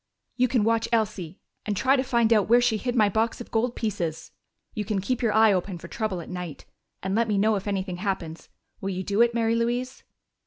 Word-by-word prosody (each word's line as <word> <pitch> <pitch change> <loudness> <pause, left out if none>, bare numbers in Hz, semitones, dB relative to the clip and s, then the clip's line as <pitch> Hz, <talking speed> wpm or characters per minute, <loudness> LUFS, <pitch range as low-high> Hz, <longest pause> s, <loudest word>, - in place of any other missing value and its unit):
"You 250 0 +3
can 240 -3 +1
watch 225 +1 +1
Elsie 210 -6 -1 0.3
and 210 -2 -2
try 265 +5 +3
to 260 - +2
find 235 -3 +3
out 210 -2 +2
where 240 +1 +7
she 240 -3 +2
hid 245 +3 -3
my 215 -3 +5
box 220 +3 0
of 240 - -9
gold 235 +2 0
pieces. 170 -8 -3 0.4
You 215 - -2
can 205 0 -1
keep 245 +6 -2
your 230 -3 +2
eye 220 -1 +5
open 185 0 -2
for 170 - -10
trouble 200 -3 -3
at - - -10
night 180 -5 -7 0.4
and 190 +1 -2
let 230 +2 +2
me 210 -2 +1
know 215 +2 +3
if 195 0 -4
anything 190 -2 -2
happens.... 180 -4 -4 0.3
Will 195 - -2
you 185 -1 -3
do 200 +4 +1
it, 235 0 +3
Mary 225 -1 +2
Louise?" 240 +3 -1
215 Hz, 230 wpm, -26 LUFS, 190-235 Hz, 0.4 s, where